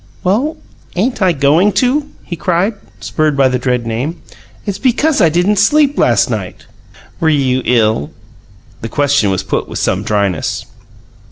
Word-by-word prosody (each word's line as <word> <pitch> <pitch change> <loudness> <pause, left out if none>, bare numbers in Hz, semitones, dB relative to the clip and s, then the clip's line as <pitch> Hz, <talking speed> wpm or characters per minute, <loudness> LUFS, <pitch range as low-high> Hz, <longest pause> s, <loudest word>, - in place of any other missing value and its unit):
"Well, 240 - 0 0.4
ain't 225 +6 -1
I 185 -2 +4
going 155 +7 +3
to?" 285 +4 +1
he 175 - -6
cried, 180 +5 0 0.3
spurred 155 -2 0
by 135 -1 +4
the 125 0 -1
dread 125 -1 -1
name. 125 +9 -3 0.5
"It's 200 -1 -3
because 275 +3 +2
I 165 - +5
didn't 180 +6 +1
sleep 290 +7 +3
last - - +3
night." - - -5 0.5
"Were 160 - +2
you 130 -4 +1
ill?" 110 -9 +2 0.7
The 115 - -5
question 140 -6 +1
was 95 -1 -1
put 95 - -2
with - - -5
some - - 0
dryness. 100 -5 -1
160 Hz, 155 wpm, -15 LUFS, 125-210 Hz, 0.7 s, I